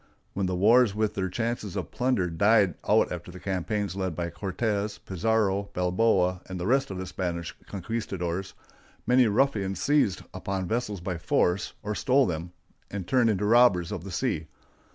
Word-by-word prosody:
When 95 -1 -1
the 90 - -1
wars 110 +3 +5
with 110 -1 0
their 95 -1 -2
chances 115 -1 -3
of 90 -4 -4
plunder 125 -8 +1
died 100 +2 +4 0.2
out - - +4
after - - -6
the 90 +1 -10
campaigns 95 +1 -2
led 95 -4 -2
by 85 0 -3
Cortés, 105 +3 -2
Pizarro, 100 0 0
Balboa, 90 0 +2
and 95 -1 -5
the 90 - -3
rest 135 +5 +2
of 95 - -5
the 95 - -4
Spanish 85 -2 -4
conquistadores, 95 -3 -4 0.5
many 125 -1 +5
ruffians 105 -4 +1
seized 140 -10 +2
upon 95 0 -3
vessels 105 -4 -2
by 90 -2 -4
force, 90 +2 +1
or 105 0 -2
stole 135 +4 +3
them, 85 -1 -4 0.4
and 100 -3 -5
turned 125 -1 +3
into 105 -1 0
robbers 105 -7 +4
of 95 -5 -4
the 100 - -7
sea. 85 -4 -2
100 Hz, 170 wpm, -27 LUFS, 90-110 Hz, 0.5 s, wars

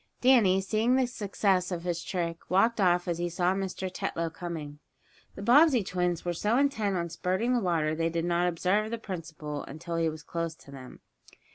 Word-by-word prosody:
Danny, 225 -8 +5
seeing 220 +5 +1
the 260 -1 +3
success 195 -5 0
of 170 -2 -3
his 175 -1 -2
trick, 170 -3 -4
walked 215 +4 +3
off 175 -1 +3
as 170 -1 -1
he 175 0 -1
saw 175 +2 +1
Mr. 190 -1 -3
Tetlow 170 -2 -3
coming. 160 -4 -6 0.6
The 195 - -7
Bobbsey 260 0 +5
twins 180 -2 -1
were 175 - 0
so 210 +7 +1
intent 245 -8 +1
on 170 -1 -2
spurting 185 +8 -1
the 245 - +3
water 170 -6 +1
that 155 +1 -3
they 165 0 +1
did 165 0 -2
not 175 0 +1
observe 185 +5 +1
the 230 - -3
principal 160 -8 -6
until 165 +4 -6
he 165 -1 +2
was 155 0 -8
close 165 -1 -4
to 140 - -16
them. 130 -2 -11
180 Hz, 200 wpm, -28 LUFS, 165-205 Hz, 0.6 s, Danny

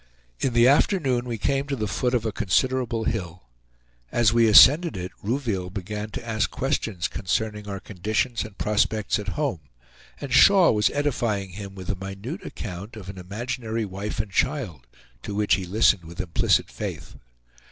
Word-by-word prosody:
In 130 - 0
the 120 +1 +5
afternoon 135 -4 +2
we 120 -2 -3
came 135 +5 -1
to 140 - -1
the 110 -4 -2
foot 125 +5 0
of 115 -2 0
a 110 - 0
considerable 120 +3 0
hill. 90 - -3 0.7
As 115 -2 +3
we 115 -1 +4
ascended 150 - +7
it 90 +1 -5
Rouville 110 -6 -2
began 105 +2 -5
to 115 - -7
ask 110 -1 0
questions 110 - -2
concerning 105 +3 -2
our 100 -1 -5
conditions 110 +6 -2
and 105 -2 -11
prospects 105 0 0
at 105 - -7
home, 140 - -1 0.6
and 135 -3 -5
Shaw 185 +6 +7
was 105 -2 +2
edifying 115 -9 -1
him 100 +1 -8
with 95 -2 -9
a - - -3
minute 95 - -7
account 100 +2 -7
of 100 -4 -9
an 95 -1 -8
imaginary 115 +4 -4
wife 100 +2 -5
and 105 -1 -2
child, 95 - -1 0.3
to 100 - -6
which 105 0 +2
he 95 0 +1
listened 100 -1 +3
with 85 +1 -11
implicit 85 - +1
faith. - - -6
110 Hz, 170 wpm, -24 LUFS, 95-125 Hz, 0.7 s, ascended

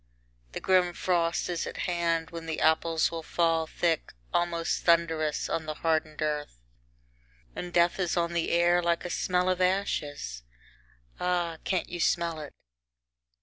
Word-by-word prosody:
The - - -3
grim 180 -2 +3
frost 170 -2 0
is 175 -2 -2
at - - -7
hand, 170 -2 0
when 165 -1 -7
the 160 - -2
apples 160 +1 +2
will 165 -1 -4
fall 165 0 +1
thick, 165 0 -1 0.2
almost 170 -1 0
thundrous, 165 -3 +2
on 160 -1 -2
the 155 - -3
hardened 155 -1 0
earth. 150 - -3 1.0
And 180 - -5
death 175 +1 +3
is 180 -2 0
on 170 0 0
the 170 -1 0
air 175 +1 +4
like 170 0 0
a 175 - -3
smell 180 0 +1
of 185 0 +1
ashes! 145 - -1 0.8
Ah! 175 -2 0
can't 185 - 0
you 175 - -5
smell 170 -1 +1
it? 150 -2 -8
170 Hz, 150 wpm, -28 LUFS, 160-175 Hz, 1.0 s, air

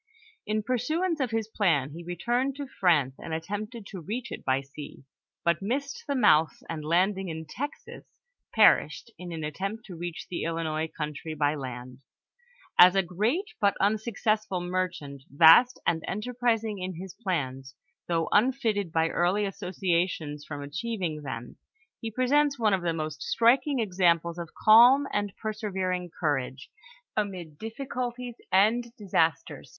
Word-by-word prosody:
In 215 0 0
pursuance 310 - 0
of 260 -3 0
his 225 -1 -1
plan 165 -11 +1
he 165 +4 -8
returned 240 +10 -1
to 285 0 -5
France, 165 - +2
and 160 - -4
attempted 210 +7 -5
to 190 -3 -8
reach 230 +7 -5
it - - -7
by 130 0 +1
sea, 140 0 -11 0.4
but 170 0 +2
missed 280 - -3
the 280 - 0
mouth, 160 - +4
and 160 -2 -5
landing 185 +4 +1
in 160 0 -6
Texas, 285 - -7 0.5
perished 235 - +4
in 180 -1 -7
an 160 -2 -5
attempt 195 +9 -4
to 185 - -9
reach 175 0 -6
the 175 - -4
Illinois 160 -1 -2
country 155 0 -5
by 145 -1 +1
land. 125 -3 -7 0.8
As 180 +1 +9
a 195 - +3
great 225 - -1
but 200 -1 +3
un 210 +2 +2
successful 215 -3 -1
merehont, 175 -6 -3
vost 165 - +7
and 160 -1 +1
enterprising 225 0 -1
in 185 0 -4
his 185 +2 -8
plans, 135 - -3 0.3
though 165 -1 0
unfitted 215 -5 +2
by 160 0 +2
early 185 +6 +1
associations 180 -6 -2
from 145 -2 -6
achieving 180 0 -3
them, 120 -4 -7 0.4
he 225 - -4
presents 275 +5 +2
one 220 -4 +2
of 190 - +1
the 170 -1 0
most 155 -2 -4
striking 265 +5 +3
examples 175 -5 +1
of 170 -2 -6
calm 245 +6 +7
and 205 -1 -1
persevering 190 -5 -3
couroge 130 -4 -2 0.5
amid 180 -8 -4
difl^culties 245 +1 -5 0.2
and 225 +5 +3
disasters. 165 -6 -1
190 Hz, 145 wpm, -27 LUFS, 160-225 Hz, 0.8 s, As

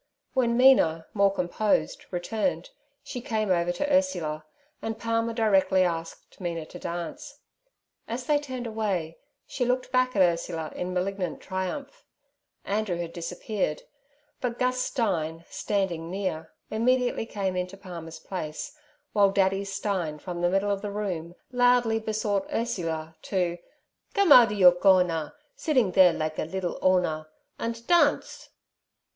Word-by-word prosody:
When 240 -3 +2
Mina, 165 -12 +5
more 200 -1 +4
composed, 200 +3 0
returned, 220 - -2 0.3
she 250 - -6
came 215 -4 -1
over 175 -1 +2
to 290 +11 -1
Ursula, 170 - +1 0.4
and 225 0 -3
Palmer 230 0 0
directly 195 -4 +3
asked 165 +1 -4
Mina 170 -3 -3
to 175 - -11
dance. 275 - -6 0.7
As 245 +2 -4
they 295 +1 +3
turned 260 -4 -6
away 200 -8 -2 0.3
she 255 - -3
looked 250 +1 0
back 255 -1 +2
at 195 - +6
Ursula 170 -2 -1
in 180 +1 -3
malignant 185 -1 -2
triumph. 190 +10 -5 0.6
Andrew 205 -2 -1
had 170 -1 -5
disappeared, 175 -1 -3 0.6
but 245 -2 -2
Gus 255 0 +1
Stein, 170 - -1
standing 175 -5 -1
near, 180 -4 -3 0.2
immediately 245 +1 +1
came 195 -4 -2
into 180 +2 -3
Palmer's 170 -4 -8
place, 185 - -6 0.4
while 200 -1 +5
Daddy 195 0 +2
Stein 195 -5 -2
from 175 +3 -6
the 175 - +3
middle 195 +2 +1
of 200 -1 -1
the 205 - -4
room 180 -5 -4 0.2
loudly 245 -2 +3
besought 215 -2 -1
Ursula 165 -9 -2
to 175 -3 -1 0.6
'Come 400 -5 +3
ouder 230 -6 +8
yer 185 -3 +8
corner, 175 - +2 0.2
siddin' 255 - +1
there 185 -2 +7
likge 155 -1 -3
a - - 0
liddle 180 +1 -3
'Orner, 175 -4 +2 0.3
andt 230 0 -4
dance.' 335 -2 +2
195 Hz, 140 wpm, -27 LUFS, 175-230 Hz, 0.7 s, ouder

